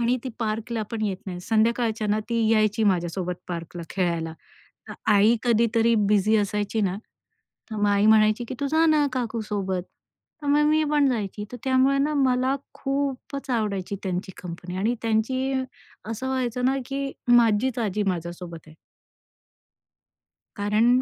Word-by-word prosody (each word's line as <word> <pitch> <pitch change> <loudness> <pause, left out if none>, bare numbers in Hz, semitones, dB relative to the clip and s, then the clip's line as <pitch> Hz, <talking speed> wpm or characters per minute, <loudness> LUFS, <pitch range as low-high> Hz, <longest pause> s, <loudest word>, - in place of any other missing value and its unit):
आणि 240 +2 +2
ती - - -2
पार्कला 225 0 -2
पण 225 -2 -3
येत 195 -3 -2
नाही. 180 -2 -5
संध्याकाळच्या 225 +2 +1
ना 210 +1 +2
ती 230 -1 +1
यायची 215 0 +2
माझ्यासोबत 180 -1 0
पार्कला 170 0 -5
खेळायला. 170 -3 -1 0.6
तर - - -6 0.2
आई 210 +3 +5
कधीतरी 230 -1 +3
बिझी 210 +1 +3
असायची 210 +1 0
ना, 190 -1 0 0.7
तर 220 - -4
मग 205 0 +2
आई 200 +1 +3
म्हणायची, 215 +1 +4
की - - -4
तू 285 - 0
जा 320 +1 +4
ना 305 -2 +4
काकू 235 -3 -2
सोबत. 190 -3 -2 0.6
तर - - -5
मग 295 +1 +4
मी 310 +1 +3
पण 295 -2 +4
जायची, 210 -3 -3
तर - - -5
त्यामुळे 265 +1 +3
ना 295 +2 +1
मला 260 -1 +2 0.2
खूपच 275 0 -3
आवडायची 205 -5 -1
त्यांची 190 0 -3
कंपनी 180 +1 -7
आणि 220 +5 +1
त्यांची 235 +4 0 0.6
असं 230 +4 -4
व्हायचं 250 -2 -1
ना, 265 +1 +2
की 275 0 -3 0.2
माझीच 240 +1 +4
आजी 210 -2 0
माझ्यासोबत 175 -1 -4
आहे. 155 - -15 1.8
कारण 220 +5 +3
220 Hz, 150 wpm, -25 LUFS, 200-255 Hz, 1.8 s, आई